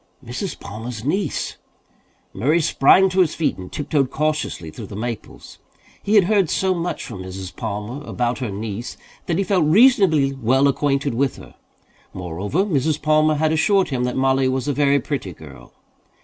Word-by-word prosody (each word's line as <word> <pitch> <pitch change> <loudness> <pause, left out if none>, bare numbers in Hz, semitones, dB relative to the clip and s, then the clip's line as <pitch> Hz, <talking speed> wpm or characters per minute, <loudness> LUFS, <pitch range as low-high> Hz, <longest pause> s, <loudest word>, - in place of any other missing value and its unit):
"Mrs. 125 - -5
Palmer's 110 +3 -7
niece!" 190 +7 -2 0.8
Murray 145 - +2
sprang 170 +4 +5
to 185 +1 -1
his 175 -4 +3
feet 160 - -1
and 90 - -9
tiptoed 145 -2 0
cautiously 150 - -2
through - - -9
the 100 - -9
maples. 115 +1 -7 0.4
He 210 - 0
had 205 - +7
heard 195 -3 +2
so 190 -1 +1
much 175 0 -3
from 95 - -8
Mrs. 95 -1 -8
Palmer 105 +8 -5
about 120 -3 -2
her 125 -4 -3
niece 105 +3 -5 0.3
that 170 - 0
he 195 - +1
felt 185 -4 +2
reasonably 170 - +4
well 135 +2 +2
acquainted 140 0 0
with 135 +2 0
her. - - -13 0.6
Moreover, 95 - -2
Mrs. 155 -4 0
Palmer 155 0 +3
had 155 +1 +1
assured 190 +5 +2
him 130 -3 -1
that 125 - -2
Mollie 135 0 +2
was 130 0 -2
a 145 - +1
very 140 0 +3
pretty 130 - -4
girl. 75 -4 -14
140 Hz, 170 wpm, -21 LUFS, 115-160 Hz, 0.8 s, had